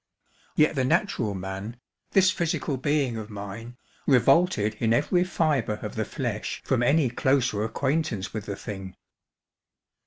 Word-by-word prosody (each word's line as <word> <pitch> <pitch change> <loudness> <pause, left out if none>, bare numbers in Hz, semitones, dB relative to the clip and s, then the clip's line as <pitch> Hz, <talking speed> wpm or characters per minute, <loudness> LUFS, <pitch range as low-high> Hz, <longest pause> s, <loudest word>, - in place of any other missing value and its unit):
Yet 155 - +4
the 135 -3 0
natural 130 - +1
man, 95 +5 -5 0.3
this 190 -1 +4
physical 165 -4 -1
being 135 -3 0
of 110 -1 -6
mine, 105 +4 -8 0.3
revolted 135 - +4
in 115 -1 +2
every 175 +8 +2
fibre 150 - 0
of - - -5
the - - -2
flesh - - -3
from 130 -2 +1
any 140 +3 +3
closer 125 -5 +1
acquaintance 130 -1 -1
with 110 -2 -5
the 100 - -3
thing. 95 -2 -7
125 Hz, 135 wpm, -26 LUFS, 105-150 Hz, 0.3 s, Yet